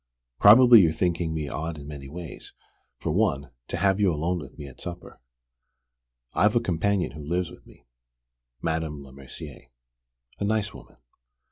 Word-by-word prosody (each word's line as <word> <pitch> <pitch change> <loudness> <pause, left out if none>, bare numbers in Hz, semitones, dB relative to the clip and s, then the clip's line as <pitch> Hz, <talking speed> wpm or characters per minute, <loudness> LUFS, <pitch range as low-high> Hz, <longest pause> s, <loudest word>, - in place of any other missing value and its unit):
Probably 115 +2 +9
you're 85 -3 +3
thinking 85 -1 0
me 80 -2 -3
odd 80 +3 -4
in 70 -1 -10
many 70 -2 -8
ways: 85 +1 -9 0.4
for - - -3
one, 70 +1 0 0.2
to - - -3
have 95 +2 +2
you 100 -3 +3
alone 85 +3 -1
with 70 -4 -11
me 75 - -8
at 70 -3 -12
supper. 90 0 -8 1.1
I've 105 +3 +3
a - - +5
companion 100 -2 0
who 75 - -9
lives 85 +2 -2
with - - -16
me, - - -19 0.8
Madame 80 -3 -2
Lemercier, 70 0 -11 0.7
a - - -2
nice 105 0 0
woman. - - -14
80 Hz, 155 wpm, -26 LUFS, 75-95 Hz, 1.1 s, Probably